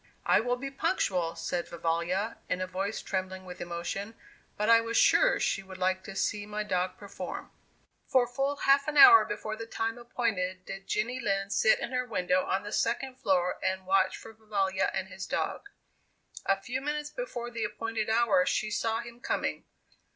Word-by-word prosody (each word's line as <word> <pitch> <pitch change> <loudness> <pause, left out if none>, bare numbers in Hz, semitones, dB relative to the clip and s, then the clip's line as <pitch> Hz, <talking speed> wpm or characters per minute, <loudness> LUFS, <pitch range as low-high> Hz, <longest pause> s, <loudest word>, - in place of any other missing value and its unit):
"I - - +5
will 245 +2 0
be 275 +2 -6
punctual," 180 -9 0
said 170 +1 -3
Vivalla, 170 +5 -1
in 180 - 0
a 185 - -1
voice 195 +3 -3
trembling 185 0 -3
with 180 0 -9
emotion; 175 +5 -4 0.4
"but 210 - 0
I 230 0 +7
was 230 0 -2
sure - - +5
she - - 0
would 190 -1 -11
like 185 0 0
to 195 - -8
see 205 +1 -1
my 210 0 -3
dog 185 -2 -1
perform." 200 -1 -7 0.6
For 255 -2 +4
full 270 +4 -1
half 280 0 +3
an 300 -1 -1
hour 395 0 +10
before 215 0 -4
the 225 +1 -7
time 225 +1 -2
appointed 185 -6 -2
did 195 0 -8
Jenny 235 +4 -1
Lind 195 -4 -1
sit - - +4
in - - -5
her 250 0 -1
window 185 -4 +1
on 190 - -1
the 205 - -7
second 255 +3 -1
floor 180 -7 +1
and 190 0 -1
watch 190 0 +2
for 225 - -11
Vivalla 200 -3 0
and 190 - -3
his 190 +1 -7
dog. 405 - -2 0.8
A 195 0 +3
few 250 +6 -4
minutes 295 +1 -3
before 245 - -5
the 230 -1 -3
appointed 220 +1 -3
hour, 225 -4 +4
she 215 +3 0
saw 225 +1 0
him 235 0 -11
coming. 265 - -2
210 Hz, 185 wpm, -29 LUFS, 185-240 Hz, 0.8 s, hour